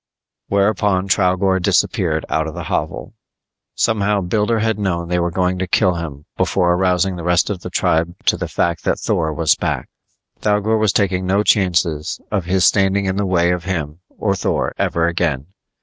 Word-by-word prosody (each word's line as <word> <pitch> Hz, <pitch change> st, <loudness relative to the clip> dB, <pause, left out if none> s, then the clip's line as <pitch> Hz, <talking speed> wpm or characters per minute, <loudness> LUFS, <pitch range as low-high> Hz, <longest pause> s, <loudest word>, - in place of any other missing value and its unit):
Whereupon 100 Hz, -1 st, +1 dB
Thougor 95 Hz, 0 st, +2 dB
disappeared 80 Hz, -2 st, +1 dB
out 80 Hz, 0 st, -1 dB
of 80 Hz, -, -7 dB
the -, -, -5 dB
hovel. -, -, -3 dB, 0.6 s
Somehow 105 Hz, -2 st, +1 dB
Builder 105 Hz, +5 st, 0 dB
had 110 Hz, -1 st, 0 dB
known 85 Hz, -4 st, -2 dB
they 90 Hz, 0 st, +1 dB
were 85 Hz, 0 st, 0 dB
going 90 Hz, +1 st, -1 dB
to 95 Hz, -, -2 dB
kill 90 Hz, +1 st, +2 dB
him 75 Hz, -4 st, -6 dB
before 90 Hz, 0 st, +2 dB
arousing 90 Hz, +1 st, +1 dB
the 85 Hz, -, -6 dB
rest 90 Hz, +3 st, +2 dB
of 95 Hz, -4 st, -5 dB
the -, -, -6 dB
tribe 85 Hz, +2 st, 0 dB
to -, -, +3 dB
the -, -, -4 dB
fact 85 Hz, -1 st, -1 dB
that -, -, 0 dB
Thor 80 Hz, -1 st, -1 dB
was 80 Hz, 0 st, +2 dB
back. -, -, -3 dB, 0.5 s
Thougor 105 Hz, +1 st, +1 dB
was 110 Hz, -2 st, +2 dB
taking 95 Hz, -2 st, 0 dB
no 100 Hz, +3 st, +2 dB
chances 85 Hz, -6 st, +1 dB
of 100 Hz, -5 st, -1 dB
his 95 Hz, +1 st, +2 dB
standing 95 Hz, 0 st, +3 dB
in 95 Hz, 0 st, -1 dB
the 100 Hz, -1 st, 0 dB
way 85 Hz, -1 st, +2 dB
of 90 Hz, -1 st, -3 dB
him 80 Hz, -4 st, -3 dB, 0.2 s
or 100 Hz, -2 st, 0 dB
Thor 90 Hz, -, -1 dB
ever 85 Hz, 0 st, +1 dB
again. 85 Hz, -5 st, -1 dB
90 Hz, 180 wpm, -19 LUFS, 85-100 Hz, 0.6 s, to